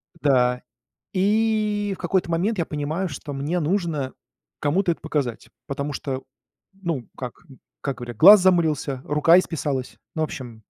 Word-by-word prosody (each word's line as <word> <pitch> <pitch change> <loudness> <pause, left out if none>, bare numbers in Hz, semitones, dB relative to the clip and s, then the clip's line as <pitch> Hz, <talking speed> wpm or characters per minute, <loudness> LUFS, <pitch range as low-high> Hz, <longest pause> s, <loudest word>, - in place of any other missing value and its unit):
Да, 125 -5 +2 0.5
и 210 +1 +1
в - - -19
какой-то 180 0 0
момент 190 +6 0
я 170 - 0
понимаю, 155 +6 -2
что 145 0 -7
мне 145 +6 -1
нужно 160 -5 -1 0.5
кому-то 175 +5 +1
это 165 - -5
показать, 140 -7 -3 0.2
потому 140 +1 -3
что, 135 -1 -4 0.5
ну, 170 -10 -4
как, 125 -2 -5 0.2
м 135 - -15 0.2
как 140 -2 -3
говорят, 120 -2 -7
глаз 205 - +9
замылился, 160 -7 +2
рука 150 +4 +5
исписалась. 145 -7 -3 0.2
Ну, 160 - -1
в - - +3
общем. 120 -6 -9
155 Hz, 150 wpm, -23 LUFS, 135-185 Hz, 0.5 s, глаз